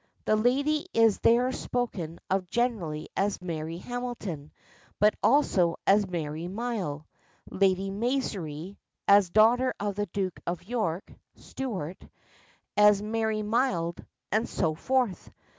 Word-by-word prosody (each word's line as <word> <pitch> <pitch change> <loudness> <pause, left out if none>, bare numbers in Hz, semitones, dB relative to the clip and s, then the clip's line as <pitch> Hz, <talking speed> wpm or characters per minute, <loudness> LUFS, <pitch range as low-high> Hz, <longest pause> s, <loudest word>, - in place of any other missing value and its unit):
The 215 - +3
lady 280 +8 +1
is 225 -3 +4
there 245 +3 +4
spoken 195 -12 -3
of 185 -2 -1
generally 200 -11 -1
as 200 +1 0
Mary 165 -2 -4
Hamilton, 215 -9 -5 0.5
but 210 +1 +5
also 205 - +3
as 200 0 +4
Mary 160 -1 -3
Myle, 190 -8 -3 0.5
Lady 195 0 +2
Maisry, 195 - -3 0.3
as 200 -2 +6
daughter 235 +6 +4
of 205 0 -1
the 205 +1 -2
Duke 185 -1 -3
of 175 0 -3
York 195 -5 -2 0.2
(Stuart), 190 - -5 0.7
as 210 -1 +6
Marie 220 0 -1
Mild, 210 -7 0 0.3
and 220 +3 +1
so 160 -4 0
forth. 245 +2 -1
205 Hz, 120 wpm, -28 LUFS, 175-235 Hz, 0.7 s, as